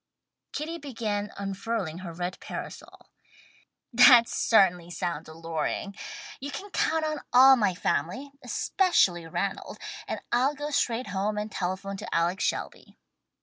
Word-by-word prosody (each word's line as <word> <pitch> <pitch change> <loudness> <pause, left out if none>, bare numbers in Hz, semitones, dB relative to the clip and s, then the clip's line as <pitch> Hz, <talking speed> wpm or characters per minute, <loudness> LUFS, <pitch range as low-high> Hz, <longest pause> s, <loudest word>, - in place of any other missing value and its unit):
'" - - -60
Kitty 325 +3 -4
began 215 -7 -3
unfurling 195 -3 -3
her 180 -2 -7
red 175 +2 -4
parasol. - - -9 0.8
"That 245 -1 +8
certainly 180 -6 +3
sounds 170 -2 -4
alluring. 165 +4 -3 0.4
You 280 - -5
can 395 +7 -7
count 320 -3 +1
on 310 0 -2
all 265 +2 +8
my 205 -7 +1
family, 210 - -1
especially 190 - +2
Ranald, 195 +4 -3 0.3
and - - -3
I'll 260 +5 +2
go 295 +1 -4
straight 245 -3 0
home 205 +2 -1
and 210 +1 -3
telephone 190 +2 -3
to - - -5
Alex 170 +3 +1
Shelby." - - -3
205 Hz, 135 wpm, -27 LUFS, 180-260 Hz, 0.8 s, That